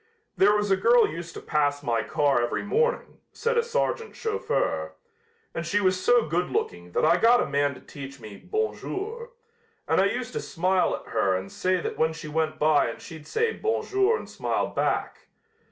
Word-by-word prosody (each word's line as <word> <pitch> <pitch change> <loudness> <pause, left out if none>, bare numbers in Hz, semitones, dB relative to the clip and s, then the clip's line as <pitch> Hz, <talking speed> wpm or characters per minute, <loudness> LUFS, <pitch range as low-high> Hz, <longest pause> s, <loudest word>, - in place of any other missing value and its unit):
"There 205 +2 +5
was 205 -1 0
a - - +6
girl 235 +5 +5
used 165 +1 -7
to - - -7
pass 145 -1 0
my 115 -4 +1
car 140 -2 +1
every 120 - -1
morning," 470 - 0
said 470 +1 -1
a 470 - +4
sergeant 465 -1 -2
chauffeur, 80 - -1 0.6
"and 165 - -3
she 170 +5 +1
was 185 -2 +1
so 245 -1 +4
good 175 +3 -1
looking 85 0 -3
that - - +2
I 165 +2 +5
got 235 +5 +5
a - - +1
man 140 0 0
to - - -13
teach 140 -1 -10
me 110 -3 -10
'bon 435 - -2
jour,' 455 +5 -5 0.6
and - - +3
I - - +4
used 245 +3 -2
to - - -2
smile 185 +1 +1
at - - -11
her 95 -1 +2
and 95 +1 -5
say 185 0 0
that - - -5
when 160 0 +2
she 160 -1 -8
went 155 0 -1
by 150 -1 +3
and 115 - -7
she'd 160 -3 -11
say 455 +1 0
'bon 440 +1 -1
jour' 395 +3 +2
and - - -9
smile - - -1
back. - - -2
175 Hz, 200 wpm, -26 LUFS, -, 0.6 s, a